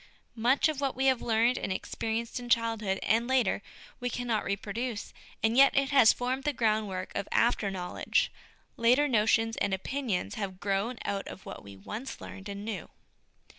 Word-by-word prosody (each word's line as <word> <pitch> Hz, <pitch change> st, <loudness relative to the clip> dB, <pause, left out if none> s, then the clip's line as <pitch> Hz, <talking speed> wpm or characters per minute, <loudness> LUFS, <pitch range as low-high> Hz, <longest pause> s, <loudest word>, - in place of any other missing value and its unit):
Much 245 Hz, +6 st, +3 dB
of 305 Hz, -3 st, -2 dB
what 275 Hz, -2 st, 0 dB
we 265 Hz, -, 0 dB
have 260 Hz, -2 st, +3 dB
learned 230 Hz, +2 st, +2 dB
and -, -, -3 dB
experienced 225 Hz, +5 st, -3 dB
in 245 Hz, 0 st, -8 dB
childhood, 225 Hz, -4 st, +1 dB
and 230 Hz, +3 st, +2 dB
later, 255 Hz, -7 st, +2 dB, 0.4 s
we 245 Hz, -, -2 dB
cannot 240 Hz, -3 st, -1 dB
reproduce, 205 Hz, +3 st, -3 dB, 0.3 s
and 225 Hz, +1 st, +3 dB
yet 275 Hz, +1 st, +6 dB
it 275 Hz, +1 st, +2 dB
has 270 Hz, -6 st, +7 dB
formed 255 Hz, +2 st, -2 dB
the 295 Hz, -, +1 dB
groundwork 215 Hz, -6 st, 0 dB
of 200 Hz, -, -3 dB
after 235 Hz, -3 st, +2 dB
know 180 Hz, -2 st, -5 dB
ledge; -, -, +1 dB, 0.5 s
later 250 Hz, +5 st, +4 dB
notions 225 Hz, -1 st, +2 dB
and 200 Hz, -1 st, +1 dB
opinions 195 Hz, -, -2 dB
have 190 Hz, -3 st, -4 dB
grown 200 Hz, +5 st, -1 dB
out 195 Hz, -1 st, -2 dB
of 190 Hz, -, -9 dB
what -, -, -8 dB
we 100 Hz, -1 st, -11 dB
once 215 Hz, -, -7 dB
learned 195 Hz, +1 st, -9 dB
and 200 Hz, +1 st, -6 dB
knew. 210 Hz, -7 st, -5 dB
225 Hz, 175 wpm, -29 LUFS, 200-250 Hz, 0.5 s, has